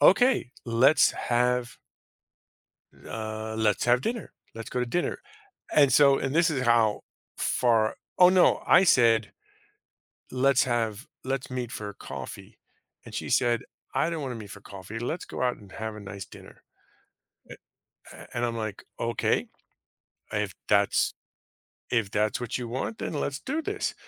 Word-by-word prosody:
"Okay, 210 - +4
let's 125 +5 +5
have" 125 0 0 1.3
"uh, 110 0 -5
let's 105 -2 +1
have 120 +1 +4
dinner. 225 - -4 0.2
Let's 115 0 -8
go 125 - -1
to 125 - 0
dinner." 175 +9 -1 0.6
And 140 -3 +5
so 140 -2 +6
and 135 +2 -2
this 165 0 +4
is 135 -5 -1
how 115 -3 +3 0.3
far 115 -3 +2 0.2
Oh, 180 0 +9
no. 185 -1 +4
I 190 - +6
said, 115 - +4 1.0
"Let's 135 0 +3
have 115 -3 -1 0.2
let's 135 0 -3
meet 125 -2 -3
for 105 -4 -5
a - - -9
coffee." - - -9 0.5
And - - -11
she - - -4
said, 120 -2 +2 0.3
"I 165 - +2
don't 165 -2 -3
wanna 130 -3 -3
meet 105 -3 -9
for 100 - -10
coffee. 100 +2 -9
Let's 160 +8 -3
go - - -6
out 125 -1 0
and 100 -3 -16
have 110 -1 -5
a - - -8
nice 100 -1 -8
dinner." - - -15 1.5
Eh - - -11
a - - -5
and 120 - +1
I'm 115 -1 -3
like, 110 -3 -5 0.2
"Okay. 115 0 0 0.9
If - - -1 0.2
that's - - +3 0.8
if 115 -5 +1
that's 105 +3 0
what 120 -2 -3
you 120 -2 -5
want, 130 - -4
then - - -4
let's 145 -1 -2
do 300 +4 -2
this," 410 +4 -2
120 Hz, 155 wpm, -27 LUFS, 110-140 Hz, 1.5 s, Oh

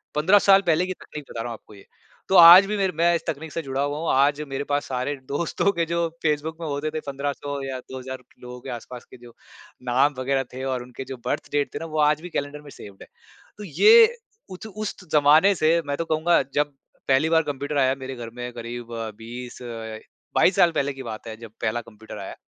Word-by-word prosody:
15 190 +7 +5
साल 195 0 +6
पहले 170 +2 +3
की 185 - -3
तकनीक 150 -4 -10
बता 115 - -5
रहा 120 0 -5
हूँ - - -4
आपको 105 - -18
ये। 100 - -16 0.4
तो 190 - +2
आज 175 +3 +10
भी 210 +1 -2
मेरे 190 -3 0
मैं 170 +1 +3
इस - - -2
तकनीक 155 +1 -4
से 165 - -2
जुड़ा 135 0 -3
हुआ 145 +1 -1
हूँ। 165 - -2
आज 140 +2 +3
मेरे 135 +1 -3
पास 145 0 0
सारे 130 +3 -2
दोस्तों 165 +7 0
के 170 0 0
जो 170 0 0 0.2
फेसबुक 155 +1 -1
में 160 - -4
होते 145 +1 -2
थे, 155 - -3
1500 140 0 -4
या 135 -1 -4
2000 130 0 -8 0.2
लोगों 125 0 -9
के 135 - -9
आस-पास 120 +1 -8
के - - -12
जो 120 -1 -15 0.6
नाम 135 +3 +3
वगैरह 135 +1 0
थे 130 +1 -6
और 130 -2 -2
उनके 125 +1 -9
जो 130 - -5
बर्थ - - -3
डेट 145 -1 -1
थे - - -3
ना, 165 - -6
वो 155 -1 -4
आज 150 +1 +3
भी 180 - -8
कैलेंडर 145 -1 -4
में 145 - -13
सेव्ड 100 -2 -13
है। - - -16 0.5
तो 210 - -8
ये 440 - +6 0.3
उत 190 +4 -9
उस 215 -1 -3
त 170 - -22
ज़माने 155 +7 +6
से, 165 +1 +2
मैं 140 - -2
तो 165 - -2
कहूँगा, 160 +1 +2
जब 145 0 +1 0.3
पहली 135 +4 +3
बार 165 -1 +3
कम्प्यूटर 145 +1 -4
आया 130 0 +3
मेरे 135 0 -7
घर 115 -1 -7
में, 125 0 -6
क़रीब 120 0 -7 0.3
20, 120 +2 -9 0.8
22 185 - +4
साल 170 - +5
पहले 140 -2 -1
की 135 0 -9
बात 110 -1 -7
है, 110 0 -7
जब 115 -2 -11
पहला 120 +1 -1
कम्प्यूटर 110 -1 -12
आया। - - -7
145 Hz, 230 wpm, -24 LUFS, 130-165 Hz, 0.8 s, आज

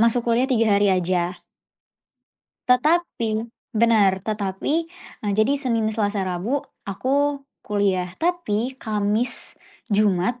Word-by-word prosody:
masuk 230 +1 +3
kuliah 250 +3 +2
3 225 -5 +3
hari 205 - +4
aja. 180 -1 0 1.2
Tetapi 250 -5 +2 0.3
benar. 215 -4 +3
Tetapi, 205 +4 -2 0.5
eee, 205 - 0
jadi 215 +5 +3
Senin, 230 -5 0
Selasa, 205 -3 -1
Rabu 190 +10 -1 0.2
aku 275 +7 0 0.2
kuliah. 195 -3 0
Tapi 265 -9 -1
Kamis, 215 +1 -2 0.3
Jumat 210 +2 +1
215 Hz, 105 wpm, -23 LUFS, 200-250 Hz, 1.2 s, hari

